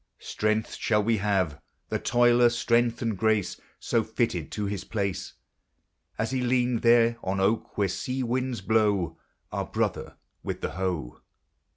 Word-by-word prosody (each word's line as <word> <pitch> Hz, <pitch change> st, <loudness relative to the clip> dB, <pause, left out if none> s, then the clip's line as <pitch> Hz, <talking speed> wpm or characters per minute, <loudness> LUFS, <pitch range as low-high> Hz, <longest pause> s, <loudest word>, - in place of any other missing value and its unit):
Strength 110 Hz, +1 st, -1 dB
shall 105 Hz, -2 st, +1 dB
he 115 Hz, 0 st, +2 dB
have, 95 Hz, -7 st, 0 dB, 0.3 s
the -, -, -1 dB
toiler, 120 Hz, 0 st, +4 dB
strength 120 Hz, 0 st, +1 dB
and 115 Hz, -2 st, 0 dB
grace, 110 Hz, -2 st, 0 dB, 0.2 s
So -, -, +1 dB
fitted -, -, -2 dB
to 105 Hz, -, -2 dB
his 100 Hz, -1 st, -3 dB
place 100 Hz, -3 st, -3 dB, 0.8 s
As 110 Hz, +2 st, -1 dB
he 130 Hz, -1 st, 0 dB
leaned, 125 Hz, -1 st, +1 dB
there, 115 Hz, 0 st, +5 dB
an 95 Hz, +1 st, -1 dB
oak 100 Hz, +4 st, 0 dB
where 100 Hz, -1 st, +2 dB
sea 130 Hz, +7 st, -3 dB
winds 125 Hz, -2 st, -1 dB
blow, 100 Hz, -5 st, +1 dB, 0.3 s
Our -, -, -3 dB
brother -, -, -2 dB, 0.2 s
with -, -, -5 dB
the -, -, -2 dB
hoe. 90 Hz, -9 st, -3 dB
110 Hz, 150 wpm, -27 LUFS, 100-120 Hz, 0.8 s, there